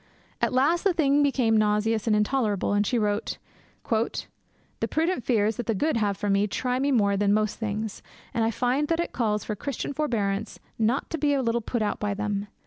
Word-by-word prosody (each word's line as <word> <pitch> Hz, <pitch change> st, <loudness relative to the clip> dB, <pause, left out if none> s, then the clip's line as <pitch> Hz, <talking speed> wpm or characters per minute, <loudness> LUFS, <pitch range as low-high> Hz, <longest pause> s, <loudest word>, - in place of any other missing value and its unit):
At -, -, +2 dB
last 290 Hz, +7 st, +2 dB
the 390 Hz, -, +3 dB
thing 290 Hz, -3 st, +3 dB
became 260 Hz, -6 st, +2 dB
nauseous 215 Hz, +1 st, +1 dB
and 215 Hz, -, +4 dB
intolerable, 210 Hz, -3 st, +1 dB
and 205 Hz, 0 st, +2 dB
she 245 Hz, -, +1 dB
wrote, 210 Hz, -1 st, -1 dB, 0.5 s
'The 225 Hz, -1 st, -4 dB
prudent 325 Hz, -4 st, 0 dB
fears 220 Hz, -3 st, +1 dB
that 240 Hz, -, -4 dB
the 225 Hz, -, +1 dB
good 300 Hz, +6 st, +1 dB
have 205 Hz, -3 st, 0 dB
for 205 Hz, -, -3 dB
me 200 Hz, +1 st, +2 dB
try 250 Hz, +4 st, -1 dB
me 280 Hz, +1 st, +1 dB
more 200 Hz, -6 st, +3 dB
than 205 Hz, +1 st, +2 dB
most 215 Hz, -1 st, 0 dB
things, 215 Hz, -1 st, -3 dB, 0.3 s
and 230 Hz, -, +1 dB
I 225 Hz, -, +2 dB
find 255 Hz, +6 st, 0 dB
that 330 Hz, +1 st, 0 dB
it 340 Hz, -, -2 dB
calls 210 Hz, -3 st, 0 dB
for 215 Hz, -, -3 dB
Christian 280 Hz, +5 st, -4 dB
forbearance 220 Hz, -8 st, -1 dB, 0.2 s
not 230 Hz, +4 st, 0 dB
to 325 Hz, -, -2 dB
be 290 Hz, 0 st, +2 dB
a 270 Hz, -, 0 dB
little 235 Hz, 0 st, 0 dB
put 230 Hz, 0 st, -2 dB
out 210 Hz, -, -1 dB
by 205 Hz, -1 st, -1 dB
them. 205 Hz, 0 st, -2 dB
225 Hz, 210 wpm, -26 LUFS, 210-270 Hz, 0.5 s, and